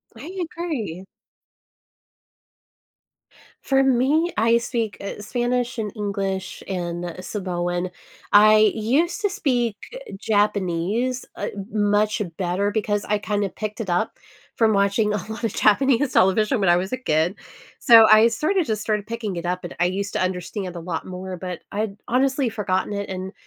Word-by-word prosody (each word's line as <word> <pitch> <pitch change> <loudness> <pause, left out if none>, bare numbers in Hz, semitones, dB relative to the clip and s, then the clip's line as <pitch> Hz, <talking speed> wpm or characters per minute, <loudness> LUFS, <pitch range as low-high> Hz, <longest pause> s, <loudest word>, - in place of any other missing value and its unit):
I 370 +4 -9 0.2
agree. 225 - -4 2.6
For 270 0 +3
me, 270 +7 +2
I 230 +2 +4
speak, 230 -3 -3
uh, 200 +1 -6
Spanish 245 +2 -1
and 215 -2 -3
English 195 -2 -3
and 175 -2 -4
Samoan. 175 -2 -3 0.4
I 215 +1 +7
used 275 - +1
to 410 - +1
speak 250 - 0 0.4
Japanese, 205 +4 0
uh, - - -3 0.2
much 210 0 +1 0.2
better 190 +2 0
because 210 -1 -1
I 210 - +1
kind 205 0 -1
of 195 - -4
picked 215 +2 -4
it 195 - -5
up 175 0 -1 0.4
from 220 -2 +3
watching 200 +2 +2
a - - +1
lot 220 - -7
of 225 - -1
Japanese 260 +4 +3
television 210 +5 +3
when 190 -3 +2
I 175 - +5
was 190 +6 -3
a - - 0
kid. 160 -5 0 0.4
So, 225 -4 +8
I 215 +1 +8
sorta 310 - +1
just 215 -7 -2
started 210 -1 -1
picking 225 -5 -4
it 170 0 -5
up, 180 +1 -2
and 175 - -7
I 175 - +3
used 195 +2 -2
to - - -1
understand 185 +1 -3
a - - -5
lot 165 -1 -4
more, 185 0 -6
but 180 -1 -6
I'd 205 -1 -3
honestly 265 +1 +1
forgotten 205 -2 -1
it, 200 -1 -4
and 190 0 -5
210 Hz, 155 wpm, -23 LUFS, 185-235 Hz, 2.6 s, So